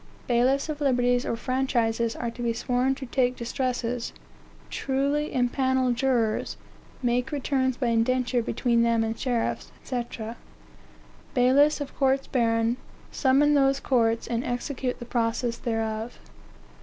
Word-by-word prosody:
"Bailiffs 255 +4 +2
of 305 -1 -5
liberties 245 -2 +2
or - - 0
franchises 235 -2 0
are 235 -1 -3
to 240 - -9
be 235 -1 0
sworn 250 +3 0
to 265 - -7
take 250 0 +1
distresses, 245 -1 -2 0.6
truly 280 +3 0
impanel 260 0 +1
jurors, 240 -3 0 0.5
make 245 +1 +1
returns 260 -3 0
by 260 - -1
indenture 245 +2 +1
between 235 0 +1
them 230 -1 +3
and 225 0 -2
sheriffs, 245 -3 -1
&c. 245 -2 -2 1.3
"Bailiffs 270 +5 +4
of 285 - -6
courts 270 0 +2
baron 230 -1 +1 0.3
summon 285 +2 +3
those 275 -1 +3
courts, 230 -4 +1
and 235 0 -2
execute 250 +1 -3
the 240 - -8
process 235 0 -1
thereof. 225 0 -3
245 Hz, 130 wpm, -26 LUFS, 235-265 Hz, 1.3 s, Bailiffs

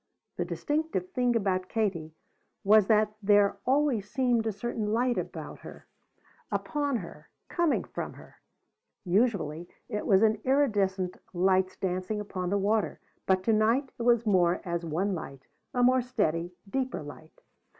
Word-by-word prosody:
The - - -1
distinctive 295 - -2
thing 245 -1 +1
about 185 -4 0
Katie 175 -8 -2 0.5
was 210 0 +5
that 215 -1 +3
there 205 -1 +3
always 260 -7 +2
seemed 240 -2 +1
a - - +1
certain 215 +1 -3
light 245 +2 +2
about - - -5
her, - - -12 0.7
upon 290 -3 -1
her, 190 -8 -7 0.2
coming 345 -3 +1
from - - -6
her. - - -16 0.7
Usually 175 -5 0 0.2
it 210 -3 -4
was 195 +1 +5
as 220 0 +4
iridescent 205 -9 +1 0.2
lights 185 +1 +2
dancing 185 +3 -2
upon 185 -3 -4
the 200 - +1
water; 210 +2 0 0.3
but 185 -1 +2
to 225 - +2
night 230 +6 +2
it - - -3
was 235 -1 +3
more 180 -4 +3
as 170 -1 -2
one 175 +5 -1
light, 135 -6 -7 0.3
a 245 - +1
more 255 +1 +5
steady, 180 -8 -1
deeper 255 - -2
light. 150 +2 -12
210 Hz, 150 wpm, -28 LUFS, 185-240 Hz, 0.7 s, was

